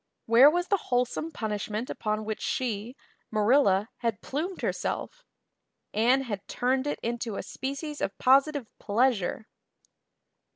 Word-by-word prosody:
Where 240 +5 +8
was 350 +3 -1
the 400 - +4
wholesome 250 +6 0
punishment 215 -1 -3
upon 215 0 -2
which 215 0 -4
she, 235 -1 -2 0.3
Marilla, 215 -2 +3
had 230 -4 -2
plumed 330 +10 -4
herself? - - -3 0.7
Anne 245 +5 +3
had 205 -6 -5
turned 260 +3 0
it 290 - -2
into 235 -2 -2
a - - -4
species 280 +3 -5
of 195 - -2
positive 275 +1 +4
pleasure. 220 -2 +1
245 Hz, 125 wpm, -28 LUFS, 215-275 Hz, 0.7 s, Where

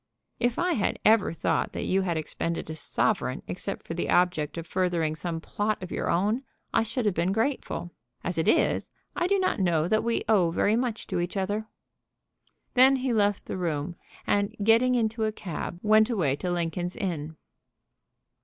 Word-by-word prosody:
"If 240 -1 +1
I 355 0 +1
had 205 - 0
ever 215 -2 +5
thought 165 - -1
that - - -3
you 190 +1 +2
had 175 -3 -1
expended 160 +1 -3
a - - -5
sovereign - - -1
except - - -5
for - - -5
the - - -2
object 175 -4 +2
of 165 - -4
furthering 175 -4 0
some 165 +1 -3
plot 205 +4 -2
of 185 - -7
your - - -2
own, 210 +8 +1 0.3
I - - +4
should 230 +2 -2
have 205 - +2
been 175 +2 +1
grateful. 225 -5 -1 0.3
As 175 -2 -1
it 160 - 0
is - - +2 0.3
I 350 - +1
do 400 +1 +3
not 370 - 0
know 170 -4 +2
that 215 +4 +2
we 235 0 0
owe 195 -6 +4
very 205 +5 +2
much 235 -2 -1
to - - -2
each 175 +3 -2
other." 205 +3 -1 1.1
Then 265 +2 +6
he 260 -1 -1
left 205 -2 +1
the - - -4
room, 170 -1 -2 0.3
and, 205 +2 +1
getting 230 +4 +4
into 225 -1 0
a 215 - 0
cab, 175 -4 -6
went 215 +1 +5
away 170 - +1
to 180 - -3
Lincoln's 175 +1 -2
Inn. 160 -5 -3
195 Hz, 185 wpm, -27 LUFS, 170-225 Hz, 1.1 s, Then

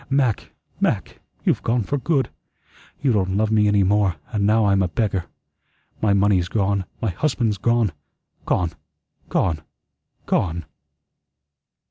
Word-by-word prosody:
Mac, 135 -6 +1 0.3
Mac, - - -1 0.3
you've - - +2
gone 115 0 +1
for 145 +7 -1
good. 140 -1 0 0.7
You 130 -4 +3
don't 95 -2 +1
love 110 +1 +1
me 105 -1 +4
any 105 -1 +4
more, 100 -2 +2 0.2
and 100 -1 +1
now 110 0 +4
I'm 100 -1 +3
a 95 - +2
beggar. 95 -2 -1 0.8
My 105 - +3
money's 100 -3 +3
gone, 100 -1 0 0.2
my 110 - +1
husband's 115 - 0
gone, 115 -2 +2 0.6
gone, 85 -2 +1 0.6
gone, 80 -5 +1 0.6
gone!" 85 -3 0
105 Hz, 130 wpm, -22 LUFS, 95-115 Hz, 0.8 s, me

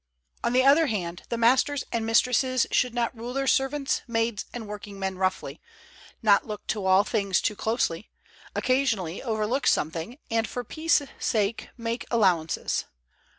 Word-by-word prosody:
On - - +1
the 255 +1 +4
other 295 +4 +6
hand, 180 -6 -3
the 235 - -1
masters 255 +4 +3
and 230 -1 -1
mistresses 250 +2 +3
should 250 -1 +1
not 240 0 -1
rule 235 +2 -6
their 275 0 0
servants, 270 +1 +1
maids 225 -2 -1
and 230 -3 -7
workingmen 200 -2 -5
roughly, 185 0 -2 0.6
not 205 -1 +4
look 210 -1 -6
to 205 -3 -1
all 190 +1 +5
things 200 -3 0
too 210 - -1
closely, 220 -5 -1 0.5
occasionally 225 -10 0
overlook 225 +2 -1
something, 165 - 0
and 225 -1 +1
for 245 - -5
peace' 315 +2 +1 0.2
sake 220 -3 -1
make 230 0 -4
allowances. 185 -8 +1
230 Hz, 150 wpm, -26 LUFS, 200-255 Hz, 0.6 s, other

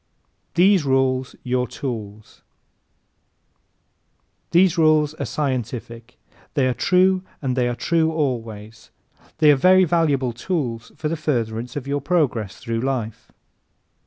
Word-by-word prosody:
These 185 0 +4
Rules 130 -1 0
Your 125 0 0
Tools 110 -5 -7 2.1
¶ - - -47
These 175 0 +4
rules 155 -2 +3
are - - -5
scientific. 125 -4 -4 0.4
They 140 -4 +2
are 130 - +1
true 185 +6 +3 0.2
and 130 -3 -2
they 125 -1 +1
are 120 - -2
true 160 +3 +1
always. 115 -8 -4 0.5
They 155 -2 +6
are - - +5
very 185 +7 +5
valuable 150 -7 +1
tools 120 -5 -3
for 155 - -3
the 165 - -1
furtherance 120 -6 -2
of 145 -3 -4
your 140 +1 -2
progress 135 - 0
through 115 -2 -3
life. 120 -4 -4
130 Hz, 130 wpm, -22 LUFS, 120-160 Hz, 2.1 s, They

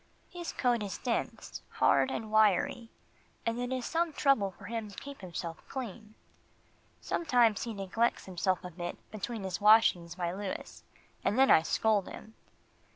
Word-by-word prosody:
His 350 -1 -5
coat 245 -3 +1
is 200 -2 -4
dense, 240 -2 -3
hard - - +3
and 220 -4 -4
wiry, 220 +2 +3 0.6
and 230 +1 -1
it 245 +1 -3
is 255 -2 -2
some 335 0 0
trouble 275 -9 +3
for 190 - -14
him 225 -1 -4
to 200 - -13
keep 280 0 -9
himself 170 -2 -6
clean. 220 -4 -7 0.9
Sometimes 240 - +2
he 230 - -4
neglects 200 +4 0
himself 185 0 -1
a 180 - -6
bit 175 +1 -5
between 215 0 -5
his 190 -1 -4
washings 205 -5 +5
by 175 -2 -2
Louis, 195 0 -6 0.4
and 210 - +1
then 270 0 +6
I - - +7
scold 205 +4 +1
him. 220 - -11
215 Hz, 155 wpm, -31 LUFS, 190-240 Hz, 0.9 s, I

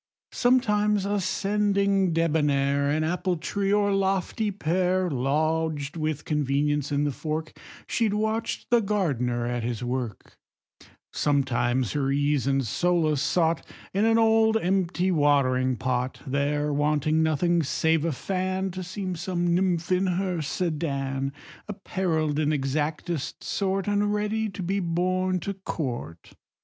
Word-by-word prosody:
Sometimes 210 -5 +2
ascending, 200 -1 +1
debonnair, 145 -4 +1
An 155 +2 +1
apple 180 +2 -1
tree, 195 +5 -2
or 205 -1 +3
lofty 195 +2 0
pear, 185 -1 0
Lodged 150 +2 0
with 155 -2 -2
convenience 145 0 0
in 145 0 +1
the 145 - 0
fork, 155 +3 -4 0.3
She 230 -2 +1
watch'd 220 +2 -1
the 240 - +6
gardener 135 - 0
at 120 0 -2
his 115 0 -3
work; 120 -4 -4 0.7
Sometimes 130 -4 +1
her 140 -2 0
ease 145 -1 +1
and 135 -1 +1
solace 155 +2 +1
sought 165 -2 +1 0.3
In 200 +3 +2
an 225 0 +4
old 225 0 +4
empty 185 -2 0
watering 135 -5 +2
pot: 125 +1 -2
There, 145 +2 0
wanting 150 +2 +1
nothing 165 +2 +2
save 160 +1 +1
a 165 - 0
fan, 185 +5 -2
To 185 +1 -6
seem 185 0 -4
some 175 0 -1
nymph 175 -1 0
in 185 +1 +2
her 180 -1 -1
sedan 140 -4 -2 0.4
Apparell'd 170 -7 -1
in 155 -1 +1
exactest 150 +2 -2
sort, 195 -1 -1
And 205 0 +1
ready 210 +1 -1
to 195 -1 -6
be 195 +3 0
borne 185 +1 0
to 200 - -3
court. 125 - -5
165 Hz, 130 wpm, -26 LUFS, 145-190 Hz, 0.7 s, the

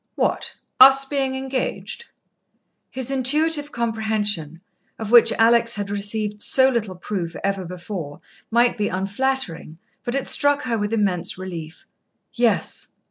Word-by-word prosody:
"What, - - -1 0.2
us 270 +1 +8
being 270 -1 -1
engaged?" 265 - -4 0.8
His 260 0 -5
intuitive 295 +3 +2
comprehension, 215 -8 -2 0.4
of 220 -1 -6
which 240 -1 +7
Alex 230 0 +3
had 205 -1 -4
received 210 +1 -3
so 260 +3 +4
little 220 -7 -2
proof 180 -2 -5
ever 195 -1 -1
before, 175 -4 -7 0.3
might 240 0 +2
be 205 - +1
unflattering, 195 -4 -2 0.3
but 240 - -3
it 275 - -2
struck 285 0 +2
her 240 -2 -1
with 210 -1 -2
immense 190 -6 0
relief. 175 -4 -8 0.5
"Yes." 235 -4 0
220 Hz, 130 wpm, -22 LUFS, 195-260 Hz, 0.8 s, us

